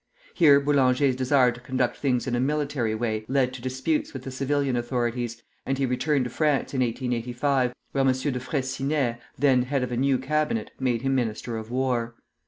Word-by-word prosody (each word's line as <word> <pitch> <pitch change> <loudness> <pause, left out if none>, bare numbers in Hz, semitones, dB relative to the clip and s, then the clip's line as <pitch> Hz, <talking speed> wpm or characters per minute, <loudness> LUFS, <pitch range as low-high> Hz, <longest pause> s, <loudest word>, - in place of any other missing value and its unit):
Here 145 -5 +6
Boulanger's 140 -2 +3
desire 130 -1 +3
to 120 - -10
conduct 125 0 -1
things 125 -4 0
in 130 - -2
a - - 0
military 140 -4 0
way 110 -1 -2
led 130 -1 +1
to 130 - -8
disputes 130 +5 -1
with 135 -2 -7
the 130 - -6
civil 140 +2 0
authorities, 120 -1 -2 0.2
and 135 0 -1
he 135 - +1
returned 130 +3 +1
to 125 - -5
France 150 -2 0
in 130 - 0
1885, 125 +2 0 0.2
where 135 - +1
M. 135 - +4
de 130 0 -2
Freycinet, 135 -1 -1 0.2
then 130 -2 +4
head 130 +1 -1
of 125 - -3
a 120 - -2
new 135 +1 +2
Cabinet, 155 - -1
made 125 -2 0
him 135 0 +1
Minister 120 -2 -2
of 110 0 -6
War. 125 -2 -1
130 Hz, 190 wpm, -25 LUFS, 120-140 Hz, 0.2 s, Here